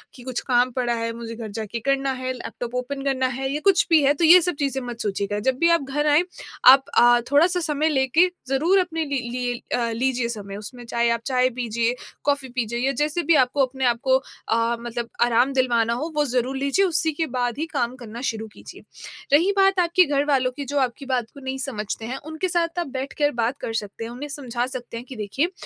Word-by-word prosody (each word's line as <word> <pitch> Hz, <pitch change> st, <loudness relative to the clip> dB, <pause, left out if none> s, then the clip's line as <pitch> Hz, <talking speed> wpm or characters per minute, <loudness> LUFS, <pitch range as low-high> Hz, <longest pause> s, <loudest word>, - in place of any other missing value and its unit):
कि 245 Hz, -, -12 dB
कुछ 255 Hz, -2 st, -3 dB
काम 245 Hz, +1 st, +3 dB
पड़ा 245 Hz, -1 st, -1 dB
है, 230 Hz, 0 st, -2 dB
मुझे 230 Hz, 0 st, -7 dB
घर 225 Hz, -1 st, -6 dB
जाके 220 Hz, +2 st, -5 dB
करना 275 Hz, +2 st, 0 dB
है 255 Hz, 0 st, -2 dB
लैपटॉप 245 Hz, -1 st, -7 dB
ओपन 270 Hz, +2 st, -3 dB
करना 260 Hz, -2 st, +1 dB
है 265 Hz, 0 st, -2 dB
या 295 Hz, -, -1 dB
कुछ 390 Hz, -3 st, +5 dB
भी 325 Hz, -2 st, +6 dB
है 280 Hz, +1 st, +4 dB
तो 315 Hz, +3 st, -2 dB
ये 355 Hz, +3 st, +9 dB
सब 355 Hz, 0 st, 0 dB
चीज़ें 270 Hz, -2 st, -1 dB
मत 240 Hz, -1 st, -7 dB
सोचिएगा। 200 Hz, 0 st, -2 dB
जब 255 Hz, -, -1 dB
भी 335 Hz, -, +4 dB
आप 335 Hz, -2 st, +4 dB
घर 295 Hz, +2 st, 0 dB
आएँ 300 Hz, +4 st, +5 dB, 0.4 s
आप 270 Hz, +1 st, +9 dB
अ, 240 Hz, 0 st, +6 dB
थोड़ा-सा 345 Hz, +5 st, +4 dB
समय 310 Hz, -1 st, 0 dB
लेके 295 Hz, +5 st, +3 dB, 0.2 s
ज़रूर 320 Hz, +9 st, +3 dB
अपने 325 Hz, -3 st, -1 dB
लि 280 Hz, -2 st, -1 dB
लिए 245 Hz, 0 st, -2 dB, 0.2 s
अ, 235 Hz, -1 st, 0 dB
लीजिए 245 Hz, +1 st, 0 dB
समय 200 Hz, -3 st, -6 dB
उसमें 240 Hz, +3 st, -9 dB
चाहे 235 Hz, 0 st, 0 dB
आप 235 Hz, -, 0 dB
चाय 255 Hz, -1 st, +2 dB
पीजिए, 235 Hz, -1 st, -1 dB, 0.3 s
कॉफी 280 Hz, -2 st, 0 dB
पीजिए 235 Hz, -1 st, -2 dB
या 265 Hz, +2 st, +1 dB
जैसे 305 Hz, +3 st, 0 dB
भी 325 Hz, +1 st, +4 dB
आपको 265 Hz, +1 st, +3 dB
अपने 265 Hz, 0 st, -4 dB
आप 235 Hz, -1 st, +2 dB
को 260 Hz, -1 st, +4 dB, 0.3 s
अ, 230 Hz, +1 st, +1 dB
मतलब 235 Hz, 0 st, -5 dB
आराम 240 Hz, +2 st, +3 dB
दिलवाना 240 Hz, -3 st, +2 dB
हो 300 Hz, +8 st, -3 dB
वो 295 Hz, -, +3 dB
ज़रूर 255 Hz, 0 st, -1 dB
लीजिए, 280 Hz, +9 st, +2 dB
उसी 320 Hz, -2 st, +1 dB
के 320 Hz, +2 st, -1 dB
बाद 245 Hz, -2 st, -1 dB
ही 310 Hz, -, -1 dB
काम 240 Hz, +1 st, -1 dB
करना 235 Hz, -2 st, -9 dB
शुरू 220 Hz, -4 st, -3 dB
कीजिए। -, -, -12 dB, 0.5 s
रही 340 Hz, +7 st, +5 dB
बात 390 Hz, -1 st, +4 dB
आपके 350 Hz, +1 st, +4 dB
घरवालों 280 Hz, -3 st, +1 dB
की 285 Hz, -, -4 dB
जो 285 Hz, +2 st, -1 dB
आपकी 260 Hz, +1 st, -2 dB
बात 255 Hz, -3 st, 0 dB
को 280 Hz, -, -12 dB
नहीं 265 Hz, 0 st, -4 dB
समझते 225 Hz, -5 st, -4 dB
हैं 250 Hz, +3 st, -4 dB
उनके 315 Hz, +4 st, -3 dB
साथ 335 Hz, 0 st, 0 dB
आप 345 Hz, -, -2 dB
बैठ 270 Hz, +1 st, -5 dB
कर 290 Hz, 0 st, +3 dB
बात 235 Hz, +2 st, -1 dB
कर 225 Hz, -, -4 dB
सकते 210 Hz, 0 st, -4 dB
हैं, 230 Hz, -, -6 dB
उन्हें 280 Hz, +5 st, -7 dB
समझा 250 Hz, -4 st, -3 dB
सकते 245 Hz, -2 st, -6 dB
हैं 240 Hz, -, -8 dB
कि 260 Hz, -, -7 dB
देखिए 235 Hz, -, -1 dB
260 Hz, 230 wpm, -23 LUFS, 235-290 Hz, 0.5 s, ये